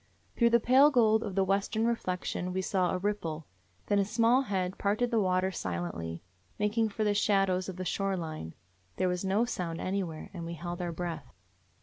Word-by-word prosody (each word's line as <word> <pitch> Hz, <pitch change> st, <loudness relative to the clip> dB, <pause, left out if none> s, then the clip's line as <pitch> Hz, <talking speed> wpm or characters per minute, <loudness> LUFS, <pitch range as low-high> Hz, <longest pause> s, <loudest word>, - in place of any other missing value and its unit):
Through 235 Hz, -1 st, +4 dB
the 235 Hz, 0 st, +5 dB
pale 260 Hz, +5 st, +6 dB
gold 220 Hz, -5 st, +4 dB
of 205 Hz, -5 st, -5 dB
the 195 Hz, -, +3 dB
western 200 Hz, +3 st, 0 dB
re 235 Hz, -, +3 dB
flection 180 Hz, -3 st, -3 dB
we 190 Hz, 0 st, -1 dB
saw 185 Hz, -2 st, +1 dB
a 185 Hz, -, 0 dB
ripple; 175 Hz, -6 st, -3 dB, 0.4 s
then 205 Hz, -, +2 dB
a -, -, +4 dB
small 230 Hz, +5 st, +3 dB
head 190 Hz, -6 st, -2 dB
parted 215 Hz, +5 st, +1 dB
the 230 Hz, -, +3 dB
water 185 Hz, -1 st, +1 dB
silently, 85 Hz, -, -4 dB, 0.3 s
making 215 Hz, +2 st, +1 dB
for 215 Hz, +1 st, -2 dB
the 210 Hz, -1 st, +2 dB
shad 195 Hz, -2 st, +3 dB
ows 185 Hz, +1 st, -1 dB
of 185 Hz, -, -6 dB
the 185 Hz, 0 st, -5 dB
shore 195 Hz, +1 st, -1 dB
line. 155 Hz, -, -6 dB, 0.4 s
There 185 Hz, -, +1 dB
was 180 Hz, 0 st, -1 dB
no 195 Hz, +5 st, +2 dB
sound 175 Hz, -8 st, -3 dB
anywhere, 185 Hz, -5 st, -3 dB
and 175 Hz, -3 st, -6 dB
we 170 Hz, +1 st, -5 dB
held 175 Hz, +2 st, -5 dB
our 175 Hz, -1 st, -2 dB
breath. 165 Hz, -5 st, -5 dB
190 Hz, 205 wpm, -30 LUFS, 175-215 Hz, 0.4 s, pale